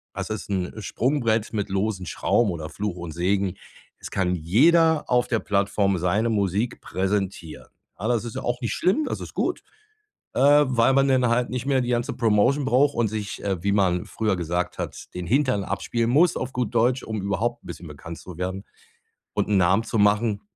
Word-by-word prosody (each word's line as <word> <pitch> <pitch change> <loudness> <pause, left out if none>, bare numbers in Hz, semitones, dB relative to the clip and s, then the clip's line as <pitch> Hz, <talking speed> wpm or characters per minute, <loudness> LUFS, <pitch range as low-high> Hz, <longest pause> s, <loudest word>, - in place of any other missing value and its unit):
das - - -4
ist 110 -2 -5
'n 95 -3 -2
Sprungbrett 115 -3 0
mit 105 -2 -2
losen 95 -1 -1
Schrauben 105 +5 +1
oder 80 -2 -5
Fluch 100 +2 -4
und 85 -2 -6
Segen 95 +2 0 0.4
es - - -9
kann 90 -2 0
jeder 155 - +4
auf 125 -1 +2
der 115 - 0
Plattform 100 -1 +1
seine 105 +7 +1
Musik 100 +2 -1
präsentieren. 95 -8 -3 0.3
Ja, 110 - -2
das 120 -2 +1
ist 115 - -7
ja - - -3
auch 120 +1 -2
nicht 115 -3 -2
schlimm, 195 - +1
das - - -3
ist - - -8
gut, - - -1 0.7
äh, 145 +2 +5
weil 125 +1 +3
man 135 0 +4
denn 130 -2 +3
halt 120 +1 +1
nicht 125 0 -4
mehr 135 -2 +2
die 120 - -3
ganze 120 -1 0
Promotion 120 +5 +2
braucht 140 +3 +3
und 120 -2 +2
sich, 105 -1 -5
äh, 95 -4 -2
wie 100 - +1
man 90 -3 +1
früher 110 -3 -1
gesagt 85 +1 -2
hat, - - -6
den 90 -1 -5
Hintern 130 - +2
abspielen 115 -1 -1
muss, 160 +6 +4
auf 130 +1 -4
gut 120 -3 -2
Deutsch, 125 +3 +2
um 110 -3 -4
überhaupt 115 +5 -2
'n - - -14
bisschen 85 - -8
bekannt 80 +3 -9
zu 90 -3 -11
werden 95 +2 -4 0.7
und - - 0
'n 105 - +3
Namen 95 +4 +3
zu 115 - -3
machen. 105 +1 +2
105 Hz, 200 wpm, -24 LUFS, 95-125 Hz, 0.7 s, äh